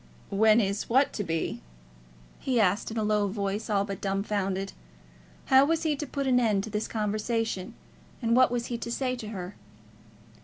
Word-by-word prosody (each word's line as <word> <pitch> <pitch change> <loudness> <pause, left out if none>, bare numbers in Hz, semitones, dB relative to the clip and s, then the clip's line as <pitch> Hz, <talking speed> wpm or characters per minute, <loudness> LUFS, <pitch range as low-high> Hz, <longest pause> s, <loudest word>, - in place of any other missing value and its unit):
"When 215 +2 +5
is 200 -1 -1
what 265 +4 +3
to 205 - -2
be?" 165 -3 -2 0.8
he 255 -3 0
asked, 200 0 +2
in 225 - -5
a 220 - +1
low 210 -1 +2
voice, 200 +2 -3
all 200 -1 +2
but 200 -2 -6
dumb 195 0 -1
founded. 195 -2 -2 0.7
How 265 0 +6
was 325 +3 +1
he 310 -2 +1
to 295 +1 -5
put 275 +1 -3
an 255 -2 +4
end 210 -5 +2
to 220 - -7
this 210 +1 -2
conversation, 215 -1 -2 0.4
and 230 -1 +1
what 255 +1 +6
was 240 -1 -2
he 235 -1 -4
to 235 - -5
say 255 +1 -1
to 230 -4 -7
her? 190 -3 -6
215 Hz, 190 wpm, -28 LUFS, 200-245 Hz, 0.8 s, How